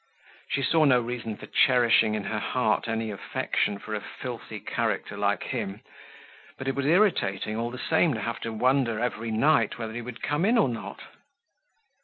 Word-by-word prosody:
She 140 - 0
saw 160 +5 +3
no 130 -3 +5
reason 115 -2 -4
for - - -9
cherishing 120 -4 +4
in 105 - -3
her 105 +1 -2
heart 115 -1 0
any 115 -1 -2
affection 100 0 -1
for 110 - -7
a 105 - -2
filthy 115 -3 -7
character 110 -3 -2
like 100 0 0
him, 105 -5 -4 0.8
but 130 - -6
it 135 - +1
was 140 +1 -1
irritating, 150 - +2
all 115 +1 -2
the 125 - -7
same, 160 +1 +2
to 110 - -4
have 115 +2 -3
to 115 - -4
wonder 125 0 +1
every 115 -1 -2
night 115 0 +2
whether 110 -2 -5
he 120 - -4
would 125 0 -9
come 145 +3 0
in 230 +5 +4
or 210 - +4
not. 115 - -6
115 Hz, 185 wpm, -27 LUFS, 110-130 Hz, 0.8 s, no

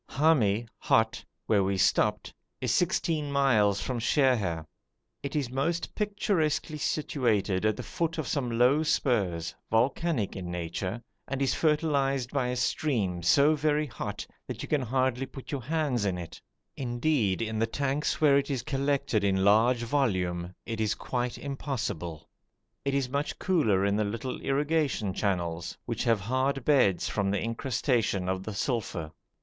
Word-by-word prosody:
Hami 120 -8 +2
(hot), 110 0 +2 0.2
where 100 -3 +3
we 95 0 0
stopped, - - +2 0.3
is 125 -2 0
sixteen 160 -3 +1
miles 110 -8 +3
from 125 -2 -2
Sheher. 110 - +1 0.6
It 140 - -5
is 135 -5 -1
most 165 +6 -1
picturesquely 165 -8 0
situated 110 - 0
at 110 - 0
the - - -5
foot 165 0 -2
of 155 -5 -2
some 125 -5 -1
low 130 +5 +4
spurs, 105 - 0 0.2
volcanic 120 - +1
in 90 -3 -5
nature, 90 +6 -4 0.2
and 135 0 -3
is 135 -2 +2
fertilised 140 -5 +1
by 135 -3 0
a 125 - -1
stream 115 - 0
so 140 - +5
very 150 0 +1
hot 120 -7 -5 0.2
that - - -5
you - - -5
can 150 -2 +1
hardly 130 +1 0
put 135 - -10
your 140 -3 -2
hands 145 -4 0
in 95 -3 0
it; 85 -2 -8 0.3
indeed, 120 -5 0
in 110 -1 -2
the 115 - +2
tanks 140 +4 -1
where 140 -3 +5
it 140 - -4
is 130 -4 -2
collected 140 -5 0
in 95 -1 +2
large 115 +4 +4
volume, 95 -10 0
it 115 -1 -3
is 110 -1 +1
quite 125 -1 -3
impossible. 125 - -4 0.6
It 140 0 0
is 135 -2 +1
much 140 +3 -2
cooler 110 - +2
in 100 0 +2
the 110 - +2
little 115 +5 -4
irrigation 140 -7 0
channels, 85 -4 -2
which 120 +1 -2
have 115 -4 +3
hard 130 +5 0
beds 125 -11 +3
from 100 -2 0
the 100 - +1
incrustation 115 -4 0
of 95 0 -1
the 105 +1 -6
sulphur. 100 - -2
125 Hz, 155 wpm, -28 LUFS, 100-140 Hz, 0.6 s, so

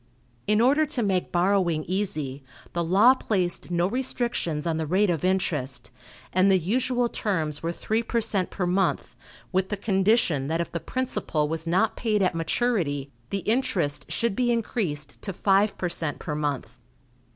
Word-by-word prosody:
In 210 +1 +3
order 290 +5 +4
to 260 -5 -1
make 190 -3 0
borrowing 175 -3 +2
easy, 155 -8 -3 0.3
the 170 - 0
law 195 +9 +6
placed 185 -11 -1
no 175 0 +1
restrictions 235 - -1
on 165 -2 0
the 160 -1 -2
rate 190 +4 +3
of 165 -1 -2
interest, 155 -9 -1 0.4
and 185 +2 +4
the 190 - +6
usual 245 +7 +1
terms 160 -10 -2
were 165 - -1
three 220 +6 -1
per 235 0 -1
cent 195 -4 0
per 180 - -2
month, 185 +2 0 0.4
with 190 0 +1
the 210 - -2
condition 195 - +2
that 165 +2 -1
if 170 - -2
the 170 - -2
principal 205 -11 -1
was 160 +1 -4
not 190 +6 +2
paid 215 -4 +1
at 185 - +2
maturity, 165 - -1 0.2
the 195 - -2
interest 205 - 0
should 235 -4 0
be 245 +1 +2
increased 180 - -2
to 195 - -4
five 200 +3 +2
per 180 - -1
cent 165 -3 -2
per 150 - -5
month. 145 -5 -3
185 Hz, 170 wpm, -26 LUFS, 160-220 Hz, 0.4 s, law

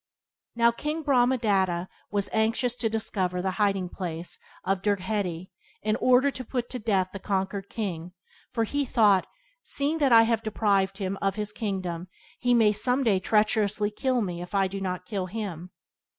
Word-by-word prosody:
Now, 235 0 +5
King 300 +6 -3
Brahmadatta 220 -10 +2 0.2
was 200 -1 0
anxious 225 +3 +1
to 240 -2 -1
discover 195 -5 -1
the 190 +1 0
hiding 195 -3 +2
place 175 -1 -5 0.2
of 195 0 0
Dirgheti, 190 -3 -1 0.3
in 215 0 +1
order 255 +3 +4
to 260 - -6
put 245 0 -3
to 250 - -4
death 195 -4 +1
the 195 - -5
conquered 195 0 -2
king, 180 -5 -4 0.4
for 230 -2 0
he 285 +6 -1
thought, 210 -7 +3 0.3
"Seeing 300 - -1
that 280 -4 +3
I 225 -1 +8
have 225 -1 +1
deprived 200 -3 +1
him 195 -1 -3
of 195 -1 +1
his 210 -1 -3
kingdom 185 -5 -3 0.3
he 245 0 +3
may 220 -3 +5
someday 235 -2 +2
treacherously 210 0 +2
kill 255 +3 0
me 175 -4 -3
If 180 +3 -7
I 195 -1 +3
do 195 +1 -6
not 180 -1 -3
kill 190 -2 -3
him." 185 -4 -5
205 Hz, 165 wpm, -27 LUFS, 190-230 Hz, 0.4 s, I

